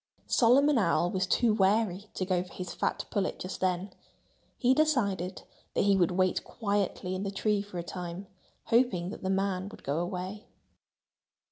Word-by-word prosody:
Solomon 260 +3 +4
Owl 175 -2 +2
was 185 -1 0
too 225 +2 +3
wary 205 -1 +2
to 185 - -1
go 180 -1 +1
for 180 - -10
his 180 -1 -6
fat - - -1
pullet 200 -4 -1
just 185 - -6
then. 185 +1 0 0.7
He 255 0 +4
decided 210 - +1 0.3
that - - +3
he 200 0 +4
would 180 -3 +3
wait 185 0 +1
quietly 200 -4 -2
in 185 - -3
the 200 - -2
tree 205 +1 0
for 200 -3 -8
a 170 - -3
time, 180 +1 -6 0.4
hoping 225 -7 +2
that - - -8
the 190 - -2
man 195 0 0
would - - -13
go 145 +3 -1
away. 185 +4 -4
195 Hz, 170 wpm, -29 LUFS, 180-210 Hz, 0.7 s, Solomon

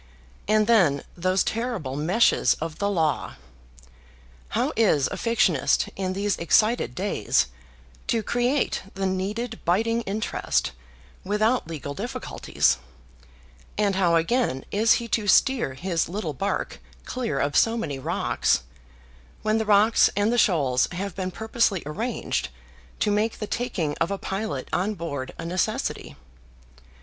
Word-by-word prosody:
And 215 0 +3
then 175 -12 +3
those 185 +2 +1
terrible 225 - -3
meshes 175 +11 +3
of 160 0 -6
the 200 - +1
Law! 160 -6 0 1.1
How - - -1
is 175 -11 +3
a - - -3
fictionist, 195 - +2
in 185 -1 -2
these 200 +1 -1
excited 215 - +2
days, - - +1 0.6
to 225 -2 +1
create 245 +5 0
the 195 0 -2
needed 205 +5 -2
biting 225 +7 +1
interest 215 - -1 0.5
without 215 +2 +1
legal 150 -3 -5
difficulties; 245 - -1 1.0
and 205 -1 +2
how 175 -3 +3
again 165 - +1
is 220 +3 +4
he 235 - -1
to 215 -2 0
steer 235 - +3
his 170 +2 -1
little 175 -5 -3
bark 195 +9 -3 0.3
clear 240 - -3
of 145 +1 0
so 230 +1 +4
many 145 -12 -3
rocks, 65 - 0 0.8
when 215 +1 +2
the 220 - -1
rocks 215 +2 +5
and 205 +3 +2
the 240 - +2
shoals 140 - +3
have 195 +2 -4
been 185 -1 -2
purposely 220 -2 0
arranged 215 +11 -2 0.5
to 210 - +2
make 215 +2 0
the 210 - -4
taking 180 -10 -2
of 165 - +2
a 200 - -2
pilot 190 -10 -4
on 200 +4 0
board 145 -7 -5
a 165 - -6
necessity? 175 +1 -2
200 Hz, 135 wpm, -25 LUFS, 165-225 Hz, 1.1 s, rocks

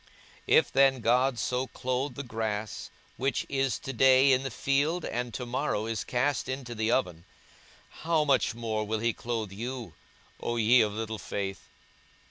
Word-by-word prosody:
42:012:028 - - +6
If - - -4
then 135 -2 +4
God 125 +3 +2
so 125 +3 -1
clothe 130 +3 -3
the 140 - -5
grass, 110 -3 -4 0.3
which 135 +2 -1
is 135 -4 0
to 135 - -6
day 130 +2 +6
in 130 0 +4
the 135 - -3
field, 145 +7 0
and 120 0 -3
to 125 - -4
morrow 120 -3 -1
is 115 -2 -2
cast 135 +3 0
into 130 -2 -4
the 110 0 0
oven; 90 -10 0 0.8
how 160 -1 +2
much 135 -4 +2
more 110 -2 -2
will 110 +1 -2
he 115 +1 0
clothe 115 -4 -4
you, 115 -2 -6 0.5
O 120 - -2
ye 115 +2 +5
of 105 -1 +1
little 110 0 -4
faith? 95 +1 -5
120 Hz, 170 wpm, -28 LUFS, 110-135 Hz, 0.8 s, 42:012:028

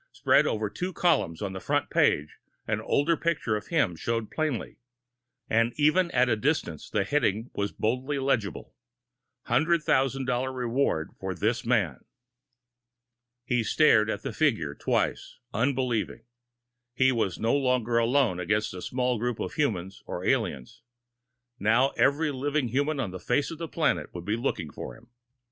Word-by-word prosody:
Spread - - +3
over 110 -1 -1
two 180 - -4
columns 85 - +1
on 95 -2 -3
the 95 - -5
front - - -1
page, 75 +1 +2 0.3
an - - -1
older 165 +4 +2
picture 160 -10 -1
of 105 - -5
him 140 - +1
showed 115 +5 -2
plainly. 155 -7 -2 0.7
And 115 +1 +2
even 155 +4 +3
at 125 -6 +3
the 120 -3 +2
distance, 110 - -1
the - - +1
heading 115 -2 0
was 100 0 -2
boldly 130 +6 -1
legible. 125 -8 -1 0.7
$100,000 135 -5 +1
REWARD 120 - 0
FOR 95 -1 -4
THIS 115 +7 0
MAN! 100 - +1 1.4
He 125 -2 +1
stared 110 -3 +4
at - - -3
the - - -4
figure 110 - +1
twice, - - -1 0.2
unbelieving. 120 -1 -1 0.7
He 130 +1 +4
was 110 -7 -1
no 115 +4 +1
longer 125 -4 +1
alone 115 -5 +2
against 105 +4 0
a 90 - -7
small 125 0 -1
group 120 0 -2
of - - -4
humans 100 - -2
or - - -5
aliens. 65 -3 -1 0.8
Now 115 +6 +3
every 150 +3 +2
living 140 -1 -1
human 145 +4 0
on 115 -8 -2
the 95 - -7
face 145 - 0
of 165 - -8
the 165 - -4
planet 160 0 0
would 85 -1 -6
be 105 +2 0
looking 105 - -2
for - - -8
him! 115 +2 -22
120 Hz, 155 wpm, -27 LUFS, 105-140 Hz, 1.4 s, stared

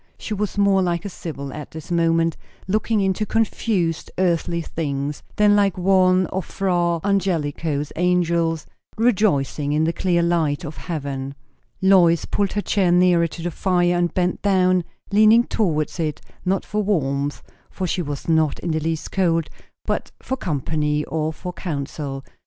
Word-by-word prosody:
She 220 - -5
was 210 0 -3
more 200 -1 +4
like 175 -1 -1
a - - -3
sybil 140 -7 -7
at 150 -1 -7
this 160 +2 -9
moment, 165 -1 +2 0.3
looking 215 +2 +1
into 190 +2 0
confused 205 -6 0
earthly 170 -2 +1
things, 145 -3 -3
than 210 -1 +5
like 200 -3 +2
one 185 0 +4
of 190 - -1
Fra 175 -3 0
Angelico's 160 -6 -1
angels 170 -2 +1 0.3
rejoicing 175 - +1
in 155 +1 +2
the 165 +1 +1
clear 175 -2 +1
light 165 -2 +1
of 150 +1 -7
heaven. 140 -4 -4 0.5
Lois 175 -4 +5
pulled 200 -2 -1
her 205 - 0
chair 195 -3 +1
nearer 175 -1 +4
to 165 +1 -9
the 175 - -2
fire, 175 0 +1
and 175 -1 +1
bent 180 -1 0
down, 185 -3 +3 0.3
leaning 215 +3 +6
towards 165 -9 -1
it; 155 -2 -1 0.2
not 190 +1 0
for 210 0 -1
warmth, 145 -8 -1 0.3
for 190 - -4
she 180 +1 -1
was 145 -3 -5
not 160 -3 +2
in 170 - -3
the 155 - 0
least 160 0 -3
cold; 165 -4 +1 0.3
but - - -2
for 265 - -3
company, 150 - -1
or 155 -1 -2
for 180 +3 -7
counsel. 140 -4 -5
170 Hz, 160 wpm, -22 LUFS, 155-190 Hz, 0.5 s, leaning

